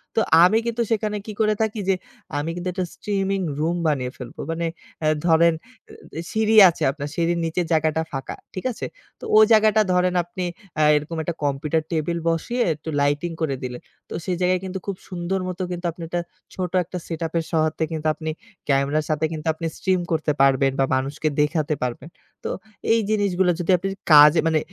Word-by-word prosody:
তো - - +3 0.2
আমি 205 +5 +5
কিন্তু 235 0 -1
সেখানে 210 -1 0
কি 215 - -5
করে 215 0 +3
থাকি? 220 - +5 0.2
যে, 190 - +4 0.4
আমি 150 +3 -2
কিন্তু 175 +1 -5
একটা 185 -1 -2
স্ট্রিমিং 195 -1 -1 0.2
রুম 165 +3 0
বানিয়ে 130 -4 0
ফেলবো। 125 -2 -10
মানে 165 +1 -2 0.4
অ্যা 155 - +2 0.2
ধরেন 165 0 +5 0.7
এ - - -2
সিঁড়ি 220 0 +2
আছে, 170 - -4
আপনার 145 0 -6
সিঁড়ির 170 +1 0
নিচে 165 +2 -1
জায়গাটা 160 0 +2
ফাঁকা। 135 -1 -5 0.2
ঠিক 185 - -6
আছে? - - -6 0.3
তো - - -17
ওই 215 - +9
জায়গাটা 215 0 +5
ধরেন 180 0 +2
আপনি 175 +1 -6 0.3
অ্যা 155 0 +3
এরকম 150 +3 -2
একটা 170 +1 -3
কম্পিউটার 150 +3 0
টেবিল 170 +1 -1
বসিয়ে 235 +10 -1
একটু 155 +2 -8
লাইটিং 145 +4 0
করে 145 -4 0
দিলেন। 125 -1 -5 0.3
তো - - -7
সেই 180 -2 0
জায়গায় 180 0 +2
কিন্তু 190 0 -4
খুব 200 -2 -3
সুন্দর 180 +1 -2
মত 180 0 -5
কিন্তু 175 0 -5
আপনি 170 +1 -13
একটা, 175 +1 -2 0.3
ছোট 180 -2 -3
একটা 180 +2 -7
সেটআপের 165 0 -2
সহায়তায় 160 0 +1
কিন্তু 155 -1 -2
আপনি 155 0 -6 0.4
ক্যামেরার 140 +2 +2
সাথে 155 +1 +1
কিন্তু 155 0 -6
আপনি 165 +1 -6
স্ট্রিম 185 -1 +1
করতে 155 -2 +1
পারবেন 135 0 +4
বা 135 - +4
মানুষকে 140 +4 -2
দেখাতে 150 0 0
পারবেন। 125 +5 -4 0.4
তো - - -1 0.4
এই 230 - +4
জিনিসগুলো 190 -4 +2
যদি 175 +2 +1
আপনি 195 +3 -3 0.2
কাজে 150 +2 +8
মানে, 160 -1 +3
165 Hz, 185 wpm, -23 LUFS, 155-185 Hz, 0.7 s, ওই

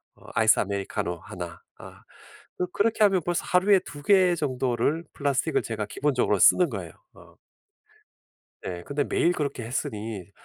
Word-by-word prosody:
어 - - -21
아이스아메리카노 100 -5 +1
1 90 -1 -8 0.2
아 - - -12 0.6
그 180 - 0
그렇게 220 +2 +1
하면 195 -3 +4
벌써 175 0 -1
하루에 190 +1 +4
2 145 -5 -11
개 185 -3 +5
정도를 130 +1 -1
플라스틱을 140 -3 0
제가 110 -2 -4
기본적으로 125 -4 0
쓰는 180 - +5
거예요 - - -6 0.2
어. - - -17 1.3
네 90 -1 -5
근데 145 +1 -1
매일 175 - +1
그렇게 140 -7 -3
했으니 110 -5 -5
135 Hz, 310 characters per minute, -26 LUFS, 105-175 Hz, 1.3 s, 개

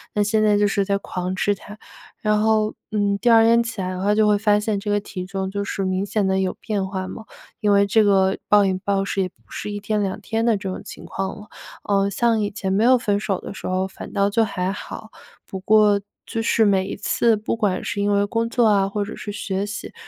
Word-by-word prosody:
那 210 - +3
现 215 +1 +1
在 210 -1 +4
就 205 - +3
是 200 0 +1
在 200 0 0
狂 185 -1 -4
吃 205 +2 +1
它。 205 +2 -11 0.5
然 210 0 +2
后， 215 0 +2 0.2
嗯， 205 -1 0
第 245 - +2
2 225 -1 +7
天 230 +1 +5
起 230 -2 -5
来 185 0 -2
的 185 0 -5
话 205 +2 +2
就 215 0 +4
会 210 - +4
发 210 0 +3
现 210 -1 -1
这 205 +1 -5
个 205 - +2
体 185 -2 -7
重 190 0 -3
就 200 0 -2
是 195 -1 -3
明 185 +1 0
显 205 0 -1
地 190 0 +1
有 190 -1 -1
变 200 -3 -2
化 190 -1 -4
嘛， 220 - -8 0.4
因 210 -3 +2
为 200 0 +5
这 215 +2 +3
个 195 -1 +3
暴 205 -1 +5
饮 190 -1 0
暴 195 -1 0
食 195 - -1
也 185 - -1
不 - - -47 0.2
是 - - -5
一 205 - -4
天 210 +1 -1
两 195 +1 -2
天 225 +2 -2
的 230 -2 +3
这 195 - -6
种 185 - -4
情 - - -10
况 195 0 -4
了。 210 - -13 0.3
呃， 200 -1 +1
像 225 +2 +1
以 205 - 0
前 195 -2 -3
没 205 +3 +2
有 255 +2 +6
分 205 -4 0
手 200 -3 -2
的 - - -7
时 - - -7
候 185 +1 0
反 190 - -10
倒 200 -1 +2
就 225 +2 +3
还 185 -3 -2
好， 215 +2 -8 0.3
不 190 - -7
过 210 +1 +4 0.2
就 225 - -3
是 225 0 +3
每 195 -2 +2
一 - - -4
次 230 -1 +2
不 210 - -2
管 205 -5 -1
是 200 - -3
因 205 0 +1
为 200 0 +2
工 230 +2 -1
作 240 0 +2
啊 200 -2 +3
或 205 0 -2
者 205 - -7
是 205 - -6
学 195 -1 -3
习， 205 +1 -6
205 Hz, 275 characters per minute, -22 LUFS, 195-215 Hz, 0.5 s, 2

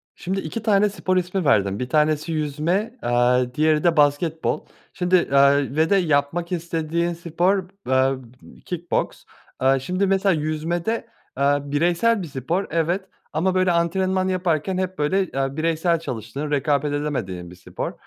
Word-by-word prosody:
Şimdi 190 +2 -3
2 195 +7 -5
tane 210 -1 +3
spor 185 -2 -1
ismi 180 +1 -1
verdin. 100 -8 +2
1 125 - -3
tanesi 155 +2 +1
yüzme, 165 - -1
eee, 125 +1 +2
diğeri 155 0 +2
de 170 -1 +3
basketbol. 150 +2 +1 0.3
Şimdi, 180 0 -1
eee, 140 -3 +3
ve 160 +3 +2
de 200 - +5
yapmak 165 0 0
istediğin 170 0 -1
spor, 175 +3 0
b 195 -6 -12
eee, 130 +1 +3 0.5
kick 175 -1 -6
boks. - - -1 0.4
Eee, 135 +1 +4
şimdi 180 +8 -1
mesela 195 0 +2
yüzmede, 165 +7 -2 0.3
eee, 140 +1 +3
bireysel 175 +9 +1
bir - - -5
spor 150 +8 -2
evet, 175 +4 -1 0.2
ama 180 +5 +1
böyle 185 -1 +3
antrenman 185 +2 +1
yaparken 185 -1 0
hep, 185 -1 -3
böyle, 170 +7 +1
eee, 135 -2 -3
bireysel 165 +1 +1
çalıştığın 130 +2 -5
rekabet 145 0 +1
edemediğin 115 -13 -3
bir 90 - -13
spor. 90 - -5
160 Hz, 155 wpm, -22 LUFS, 145-185 Hz, 0.5 s, de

